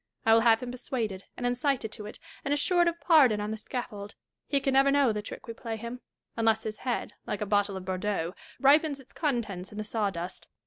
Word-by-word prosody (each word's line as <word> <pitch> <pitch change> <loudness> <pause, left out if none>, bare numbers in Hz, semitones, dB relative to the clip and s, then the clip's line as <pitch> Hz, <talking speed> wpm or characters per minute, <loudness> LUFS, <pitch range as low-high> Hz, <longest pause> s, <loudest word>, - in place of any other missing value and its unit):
I 225 - +6
will 225 - +6
have 230 0 +4
him 245 - -4
persuaded 230 -6 -4
and 245 - -3
incited 245 -2 0
to 210 -2 -7
it, - - -8 0.3
and 280 - -2
assured 345 +4 +3
of 340 0 0
pardon 275 -11 +5
on 210 +1 -2
the 220 - -3
scaffold. 210 -3 -6 0.3
He 280 - +2
can 270 0 0
never 270 +1 +5
know 275 -4 +4
the 210 - -2
trick 210 - -9
we 230 - -6
play 225 -1 -5
him; 235 +3 -7 0.3
unless 225 -1 +2
his 215 -1 -5
head, 250 -2 -2
like 205 - -2
a - - 0
bottle 200 -1 +1
of 185 - -8
Bordeaux, 185 -2 -1 0.3
ripens 285 +1 +4
its 265 - -15
contents 230 - -2
in 210 - -10
the 215 - -2
sawdust. 200 -5 -3
225 Hz, 220 wpm, -29 LUFS, 210-270 Hz, 0.3 s, I